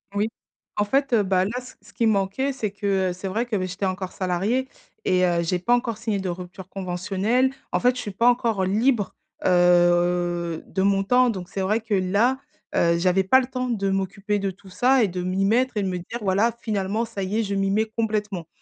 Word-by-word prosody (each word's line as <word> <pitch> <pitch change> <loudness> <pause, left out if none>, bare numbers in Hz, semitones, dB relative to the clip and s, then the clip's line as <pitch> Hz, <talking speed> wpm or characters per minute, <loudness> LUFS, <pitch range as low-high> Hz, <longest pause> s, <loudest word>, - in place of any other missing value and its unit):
Oui, 210 +2 +1 0.5
en 210 - +2
fait, 275 +5 +1
heu, 215 -3 +4
bah, 185 -1 +2
là, 200 - -3
c 255 0 -12
ce 205 - -18
qui 230 - 0
manquait 215 +6 +1
c'est 220 -6 -3
que, 195 -2 0
heu, - - -2
c'est 185 +2 -6
vrai 220 +6 -1
que, 240 -3 -3
bah, 185 - -1
j'étais 195 +2 -3
encore 185 0 -3
salariée 200 +8 -1 0.3
et 185 -1 +3
heu, 175 -1 +1
j'ai 180 +2 0
pas 240 +7 +1
encore 235 -3 -2
signé 220 -2 -2
de 190 -1 -3
rupture 180 +1 -8
conventionnelle. 195 +7 0 0.2
En - - +2
fait, 250 0 +3
je 250 - -4
suis 205 - -5
pas 230 +6 +3
encore 230 -5 +1
libre, 210 +3 +1 0.3
heu, 175 -1 +3
de 190 - -2
mon 195 0 +2
temps 250 +4 +4
donc 185 -6 -4
c'est 195 - -4
vrai 215 +4 +1
que 220 -2 -4
là, 200 +8 +2 0.4
heu, 170 0 +3
j'avais 185 +2 +2
pas 260 +7 +5
le 250 - -5
temps 255 -1 -3
de 200 -5 0
m'occuper 195 +2 -1
de 195 -1 -1
tout 190 +1 -12
ça 255 +6 +3
et - - +3
de 180 0 -4
m'y 185 +2 0
mettre 245 +4 +2
et 205 - +1
de 190 - -1
me 180 - -2
dire: 180 +7 -6
«Voilà, 205 +4 +2
finalement, 210 0 -1
ça 230 -3 -5
y 205 +4 -1
est, 225 - +1
je 200 -1 -2
m'y 195 0 +1
mets 215 +3 +2
complètement» 210 -6 -2
200 Hz, 230 wpm, -24 LUFS, 185-230 Hz, 0.5 s, pas